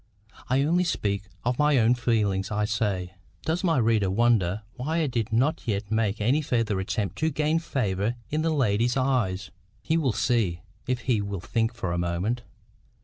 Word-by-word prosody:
I 130 +2 +3
only 170 +5 +2
speak 100 - -1 0.2
of 125 0 0
my 150 -1 +4
own 115 0 +5
feelings, 105 -6 0
I 105 0 0
say. 100 -4 -1 0.3
Does 165 +4 -1
my 165 -5 +2
reader 110 -5 +2
wonder 105 -2 +2
why 145 +6 -2
I 165 - +2
did 120 -6 -2
not 130 +8 +1
yet 100 -1 -2
make 110 -2 +1
any 125 +9 +2
further 115 -8 0
attempt 100 +1 -2
to 160 - +2
gain 155 +2 +1
favour 110 - -1 0.2
in 155 +1 +1
the 165 - +1
lady's 120 -4 +1
eyes? 110 -9 0 0.3
He 160 +1 +1
will 145 -6 +2
see, 105 -8 0 0.3
if 125 -1 -1
he 120 -5 +1
will 100 -1 -4
think 115 +6 -1
for 95 -7 -3
a 85 - -1
moment. 90 +8 -1
115 Hz, 180 wpm, -26 LUFS, 100-135 Hz, 0.3 s, own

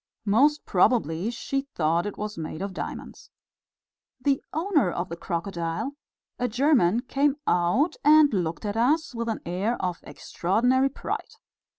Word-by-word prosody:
Most 280 +9 +3
probably 185 - +2
she 275 +3 -2
thought 165 +3 +1
it 205 - -6
was 210 0 -4
made 160 +2 -5
of 200 -1 -4
diamonds. - - -7 0.9
The 270 +1 +1
owner 320 - +1
of 175 +1 -3
the 170 - -4
crocodile, 170 +7 -3 0.4
a 250 - +1
German, 240 - +3
came 275 +2 +1
out 180 - +2
and 300 -2 +6
looked 175 0 -2
at 205 0 -2
us 280 +7 +1
with 230 0 -3
an 220 - -3
air 190 +8 -1
of 180 -2 -2
extraordinary 245 +9 0
pride. 275 - -5
220 Hz, 145 wpm, -26 LUFS, 175-275 Hz, 0.9 s, and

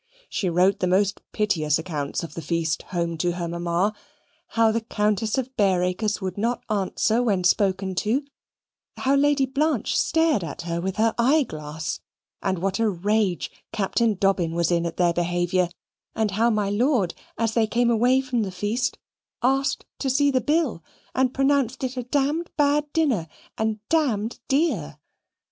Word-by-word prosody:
She 190 - -1
wrote 180 +3 +3
the 185 - +1
most 195 +2 +1
piteous 165 -8 +1
accounts 155 -2 -3
of 165 - -7
the 165 - -5
feast 160 0 -1
home 170 -3 -2
to 175 0 +1
her 175 -1 -3
mamma: 170 +4 0 0.6
how 225 -1 +5
the 230 +1 0
Countess 215 +1 0
of 260 0 -3
Bareacres 190 +1 +1
would 190 -1 -4
not 235 +3 -1
answer 215 +3 +1
when 200 -7 +1
spoken 190 +1 +2
to; 230 +10 0 0.7
how 270 - +1
Lady 280 0 +3
Blanche 275 -1 0
stared 320 - +2
at 160 +1 -6
her 170 0 -2
with 190 +1 -2
her 225 +1 +2
eye 280 +6 +4
glass; 155 - -5 0.4
and 190 -2 0
what 190 +3 -1
a 225 -1 +3
rage 200 0 0 0.2
Captain 215 +2 +1
Dobbin 190 -4 +1
was 170 0 +1
in 170 0 +1
at 165 - -7
their 175 -1 +3
behaviour; 175 +1 +1 0.5
and 220 -2 0
how 225 +4 +2
my 210 -3 0
lord, 220 - +2 0.2
as 225 -1 0
they 225 -1 +2
came 235 +2 +2
away 245 +3 +3
from 255 -3 -1
the 195 -3 -2
feast, 210 +7 -1 0.5
asked 270 +2 +1
to 270 - -1
see 285 +2 +3
the 260 -1 +2
bill, 295 - 0 0.3
and 260 -1 +2
pronounced 270 -2 +1
it 260 0 -2
a 250 - -2
d 280 +5 0 0.2
bad 295 0 +2
dinner, 265 - +1 0.3
and 220 -1 -1
d 240 -9 0
dear. 240 - 0
210 Hz, 165 wpm, -24 LUFS, 180-255 Hz, 0.7 s, how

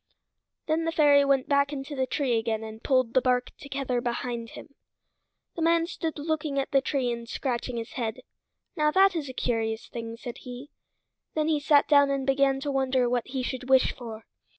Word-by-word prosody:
Then 320 +1 0
the 330 - 0
fairy 290 -3 +5
went 275 -2 +2
back 280 0 +2
into 280 0 -5
the 260 -1 0
tree 265 -5 0
again 225 -1 -2
and 220 0 -9
pulled 255 -4 +2
the 260 - +4
bark 250 -1 0
together 270 -3 -2
behind 235 -1 -3
him. 280 - -12 0.8
The 335 - -4
man 330 0 +3
stood 325 -2 -4
looking 300 -1 -2
at 275 - -1
the 275 - +4
tree 265 -3 -1
and 235 0 -6
scratching 245 -2 -3
his 225 -1 -5
head. 230 -3 -4 0.5
"Now 300 0 +2
that 385 +3 +4
is 295 -5 -3
a - - -6
curious 225 -3 -2
thing," 230 -1 -7
said 240 0 -8
he. 250 +3 -9 0.6
Then 310 -1 +1
he 305 -2 +2
sat 290 0 +4
down 285 -1 +5
and 275 -1 -1
began 270 0 +2
to 285 0 -2
wonder 260 -2 +1
what 245 -1 -1
he 260 -1 -3
should 255 0 -5
wish 265 -1 +5
for. 225 -3 -9
265 Hz, 200 wpm, -27 LUFS, 240-290 Hz, 0.8 s, fairy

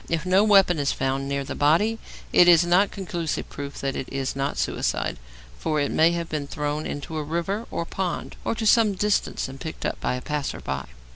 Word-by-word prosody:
If 165 +1 -1
no 185 +2 +4
weapon 195 -6 +5
is 140 -1 +1
found 135 +1 -1
near 140 0 -1
the - - -5
body, 190 +10 +2 0.3
it 175 - +7
is 170 -1 +7
not 180 +4 +4
conclusive 175 -5 -3
proof 140 0 -7
that 135 -1 -2
it 130 - -4
is 135 -1 -2
not 135 +1 -2
suicide, - - -1 0.4
for 155 - 0
it 145 - 0
may 165 +2 +4
have 170 -1 -2
been 150 -3 -3
thrown 150 +1 -3
into 145 +2 -5
a 155 - -2
river 170 +8 -2
or 170 - -3
pond, 185 0 -3
or - - -1
to 225 - -3
some 215 -1 +5
distance 210 +1 0
and 135 +1 -10
picked 160 - -6
up - - -3
by - - 0
a 125 - -5
passer 150 -2 -3
by. 65 -1 -4
160 Hz, 215 wpm, -25 LUFS, 140-185 Hz, 0.4 s, it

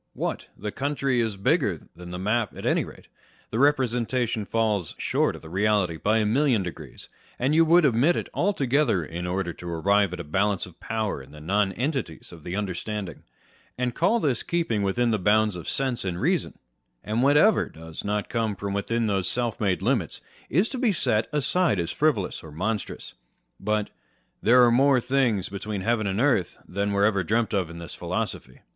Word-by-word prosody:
What! - - -3
the 105 +1 -4
county 135 -1 0
is 110 -4 -1
bigger 100 - +1
than 90 +1 -10
the 90 - -5
map 105 +3 -1
at - - -7
any - - +2
rate: - - -12 0.5
the 110 - -1
representation 125 -5 +1
falls 105 -7 0
short - - 0
of - - -12
the 80 - -10
reality 100 -3 +1
by 105 +6 +2
a 110 - +2
million 120 -1 +2
degrees, 85 -4 -8 0.3
and 130 +4 +1
you 165 +1 +6
would 170 +1 +5
omit 140 +7 +3
it - - -3
altogether 140 - +1
in 85 +3 -5
order 90 -1 -2
to 85 - -8
arrive 100 +4 +2
at 90 - -6
a - - -4
balance 95 +5 0
of 90 -3 -16
power 110 -9 -2
in 65 - -14
the 75 +1 -12
nonentities 100 - -1
of 85 -3 -12
the 90 - -4
understanding, 100 -2 -4 0.6
and 125 -1 -1
call 190 - +2
this 135 - 0
keeping 165 -12 -1
within 115 +5 +1
the 110 - +1
bounds 105 +1 +3
of 85 - -5
sense 130 -3 -1
and 90 -2 -3
reason; - - 0 0.5
and 110 +3 -1
whatever 150 +10 +4
does 80 0 -8
not 105 0 -1
come 110 -3 -1 0.2
within 115 +3 0
those 100 -3 0
self 120 -2 -1
made 95 -3 +1
limits 110 - 0 0.3
is 180 - +3
to 260 - -5
be 245 -4 +3
set 110 - +1
aside 150 - +1
as 85 0 -2
frivolous 140 -12 0
or 80 - -11
monstrous. 105 +7 -4 0.5
But 105 -1 -1 0.3
" - - -44
there 125 +2 +6
are 120 - +4
more 135 +2 +4
things 120 -6 +1
between 100 0 -5
heaven 110 0 0
and 95 +2 -1
earth 125 -9 +1
than 100 +2 -1
were 100 0 +3
ever 100 -3 +2
dreamt 110 +5 0
of 95 -5 0
in 85 - -9
this 85 0 -7
philosophy." 65 - -4
105 Hz, 190 wpm, -25 LUFS, 95-125 Hz, 0.6 s, you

